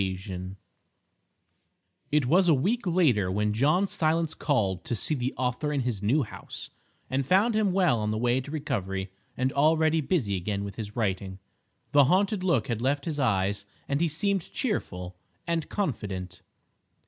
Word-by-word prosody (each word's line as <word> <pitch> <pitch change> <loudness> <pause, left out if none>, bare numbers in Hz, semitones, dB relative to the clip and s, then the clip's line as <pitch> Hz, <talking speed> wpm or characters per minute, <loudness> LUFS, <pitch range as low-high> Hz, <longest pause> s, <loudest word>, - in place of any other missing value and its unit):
III 95 -1 -4 1.6
It 150 -2 +3
was 175 +8 +4
a 160 - +6
week 200 - 0
later 140 - +3
when 105 +2 0
John 150 - +3
Silence 160 -3 0
called 100 - 0
to 120 - -1
see 115 - 0
the 130 -2 -1
author 125 +4 -1
in 140 -2 0
his 120 -6 -2
new 130 +9 +2
house, 110 - -8 0.4
and 135 +1 0
found 195 - +3
him 215 -3 +2
well 180 -10 +3
on 105 0 -1
the 110 - -1
way 120 +3 +2
to 130 - -10
recovery 95 -11 -3 0.3
and 130 +1 0
already 160 +2 +3
busy 135 - 0
again 100 +2 -2
with 100 -1 -6
his 105 -2 -6
writing. 95 -4 -2 0.5
The 145 -1 +6
haunted 190 - +2
look 175 -6 +2
had 115 -3 -2
left 140 +3 0
his 155 -3 -3
eyes, 100 -4 +1 0.2
and 140 +2 0
he 170 - +3
seemed 190 +4 -1
cheerful 90 - -3 0.3
and 165 -2 -1
confident. 105 - -3
130 Hz, 165 wpm, -27 LUFS, 100-160 Hz, 1.6 s, a